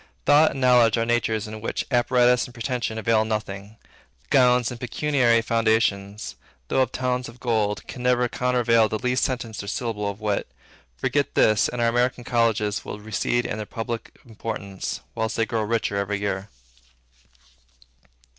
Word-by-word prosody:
Thought 150 +2 +6
and 135 - -5
knowledge 120 -3 +5
are 115 - +1
natures 115 -2 0
in 110 0 -8
which 115 - -3
apparatus 125 0 +3
and 125 - -13
pretension 115 -1 -3
avail 110 0 +2
nothing. 105 -1 -4 0.5
Gowns, 125 -2 +4
and 120 - -7
pecuniary 125 -2 +2
foundations, 110 -3 0 0.3
though 135 - +2
of 130 -1 +1
towns 125 -1 -2
of 120 +2 -14
gold, 110 -4 0
can 125 - -8
never 125 0 +2
countervail 120 -3 +2
the 110 - -1
least 125 +3 0
sentence 120 -4 -3
or 100 - -9
syllable 105 -2 -2
of 100 +1 -7
wit. 105 -2 -1 0.5
Forget 140 - -1
this, 110 -1 +4
and 125 - -5
our 120 - +3
American 120 +1 +1
colleges 115 -4 +1
will - - -6
recede 110 +3 -1
in 105 - -3
their 105 -1 -5
public 115 0 -5
importance, 110 -4 -5
whilst 110 0 -2
they 115 - +2
grow 115 -2 -1
richer 110 -2 -1
every 100 0 -1
year. 100 0 -3
115 Hz, 160 wpm, -24 LUFS, 110-125 Hz, 0.5 s, Thought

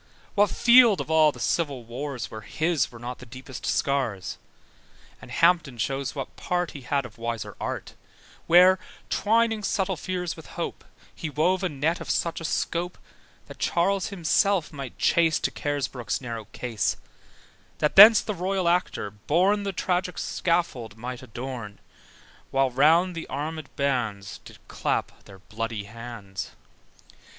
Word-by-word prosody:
What 205 0 +4
field 240 -3 +6
of - - -4
all 155 -1 +5
the - - -13
Civil 145 -7 -1
Wars, 125 +2 -5
Where 110 - -7
his 160 +9 0
were 120 - -11
not 120 +2 -7
the - - -11
deepest 130 +2 -8
scars? 130 -9 -1 0.8
And - - -12
Hampton 165 -7 +2
shows 135 +4 -2
what 135 -2 -6
part 180 -1 -2
He 140 - -9
had 140 +1 -1
of 115 -2 -12
wiser 115 -1 -4
art, - - -4 0.5
Where, 180 +2 +7 0.3
twining 225 0 +2
subtle 195 -1 0
fears 180 0 -3
with 160 - -12
hope, - - -4 0.3
He 160 - -5
wove 175 +6 +1
a 185 - +1
net 150 +4 -1
of - - -7
such 170 0 -1
a - - -5
scope, 170 +3 -2 0.5
That - - -12
Charles 190 +2 +1
himself 185 -1 +1
might 135 -4 -7
chase 165 -2 +3
To - - 0
Carisbrooke's 135 -4 -2
narrow 115 -4 -6
case: 115 0 -2 0.8
That 150 - 0
then 215 +3 +11
the 210 - -2
royal 185 0 -1
actor 170 - 0
born 175 - +1
The 200 -1 -2
tragic 180 -1 -1
scaffold 135 - -1
might 125 +2 -6
adorn: 120 -3 -7 0.7
While 135 -1 +2
round 165 +8 +4
the 165 -1 -6
armèd 155 0 -4
bands 115 -8 -2
Did - - -12
clap - - -3
their 95 - -13
bloody 110 +2 -5
hands. 105 -3 -8
150 Hz, 150 wpm, -26 LUFS, 120-180 Hz, 0.8 s, then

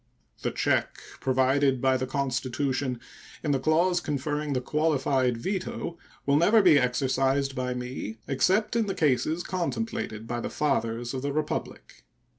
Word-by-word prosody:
The - - 0
check - - 0 0.2
provided 130 +1 +2
by 130 +1 +3
the 130 0 -1
Constitution 130 -1 -1 0.4
in 150 - 0
the 135 - +2
clause 170 +5 +2
conferring 150 0 -2
the 130 - +1
qualified 135 -3 +1
veto 180 - -4 0.3
will 140 0 +3
never 205 +7 +5
be 160 -6 +7
exercised 135 +2 +1
by 125 0 -2
me 125 -3 -5
except 190 - +2
in 225 -2 +2
the 195 - -2
cases 155 +3 +1
contemplated 180 - -3
by 120 +1 -3
the - - -3
fathers 120 -4 -1
of 130 - -3
the 140 +1 -2
Republic. 150 +1 -4
140 Hz, 145 wpm, -27 LUFS, 130-155 Hz, 0.4 s, be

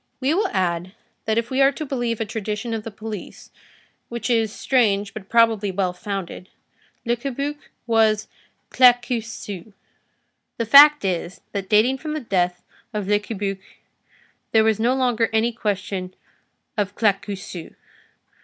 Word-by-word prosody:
We 275 +3 +1
will 395 +3 +1
add, 180 - -1 0.3
that 220 0 0
if 230 +2 -1
we 260 +1 +1
are 270 0 +6
to 310 - -5
believe 240 -5 -2
a 225 - -1
tradition 220 +1 -4
of 220 -1 -3
the 225 - -6
police, 215 -2 -8 0.6
which 235 +1 -3
is 225 -2 +2
strange 205 -6 +1
but 205 -3 -9
probably 225 -3 +3
well 185 -1 -1
founded, 190 -1 -6 0.6
Le 235 +1 +2
Cabuc 280 +4 -5 0.2
was 220 -2 +2 0.4
Claquesous. 235 -5 +1 0.8
The 230 - -1
fact 290 +2 +8
is, 180 -1 -3
that 195 -2 -4
dating 230 +5 +3
from 305 +1 -4
the 310 - -2
death 180 -7 -1 0.3
of 205 -2 -2
Le 205 0 +3
Cabuc, 205 -2 -4 0.9
there 220 -1 +6
was 220 -1 +2
no 240 +3 +2
longer 245 -4 +1
any 220 +2 +2
question 200 -4 -3 0.6
of 205 -2 -2
Claquesous. 200 -4 -2
220 Hz, 145 wpm, -22 LUFS, 200-240 Hz, 0.9 s, fact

